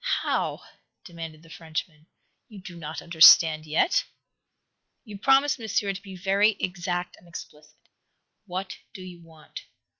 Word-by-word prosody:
"How?" - - -2 0.4
demanded 165 -3 -10
the 165 - -18
Frenchman. 160 -1 -7 0.4
"You 210 -3 -12
do 180 -1 -11
not 160 -2 -7
understand 160 -1 +6
yet?" 370 - +1 1.0
"You 205 -3 -10
promised, 270 +3 +3
Monsieur, 215 -2 -1
to 195 - -9
be 195 -2 -11
very 200 +4 +2
exact 180 -1 -4
and 175 - -21
explicit. 150 -2 -12 0.7
What 185 +1 -6 0.2
do 185 - -9
you 180 -2 -11
want?" 160 -2 -13
175 Hz, 130 wpm, -25 LUFS, 160-195 Hz, 1.0 s, understand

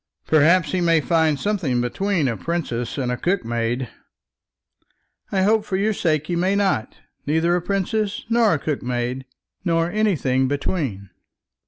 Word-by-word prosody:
"Perhaps 160 +1 +4
he 185 - 0
may 165 -2 +4
find 160 -2 +1
something 180 -12 0
between 165 +6 0
a 115 - -1
princess 125 -7 -3
and 125 -3 -1
a 125 - -2
cookmaid." 120 -8 -1 1.4
"I 190 -2 +1
hope, 215 +2 +3
for 190 - -2
your 210 +3 +1
sake, 155 -6 0
he 175 - -2
may 185 +3 +1
not; 190 - 0 0.3
neither 160 +3 +2
a 180 - 0
princess 200 +3 -2
nor 230 -2 +3
a - - 0
cookmaid, 125 -3 -3 0.4
nor 165 -1 +1
anything 150 -12 +1
between." 140 - -3
165 Hz, 145 wpm, -22 LUFS, 130-190 Hz, 1.4 s, Perhaps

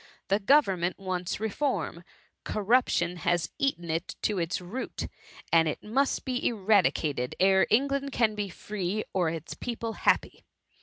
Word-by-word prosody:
The 200 +1 +3
government 195 - +3
wants 185 -1 -3
reform; 210 - -2 0.4
corruption 205 -5 +1
has 175 -3 0
eaten 175 -12 0
into 180 +4 -2
its 170 0 -1
root, 185 +9 -5 0.5
and 165 -1 +6
it 155 - -3
must 265 +6 0
be 255 -1 -2
eradicated 185 - +1
ere 190 0 +5
England 275 +3 +1
can 230 -4 +2
be 205 -2 -3
free, 200 +2 -3
or 180 -4 +2
its 160 -2 -5
people 230 -2 -4
happy. - - +1
195 Hz, 135 wpm, -28 LUFS, 175-230 Hz, 0.5 s, and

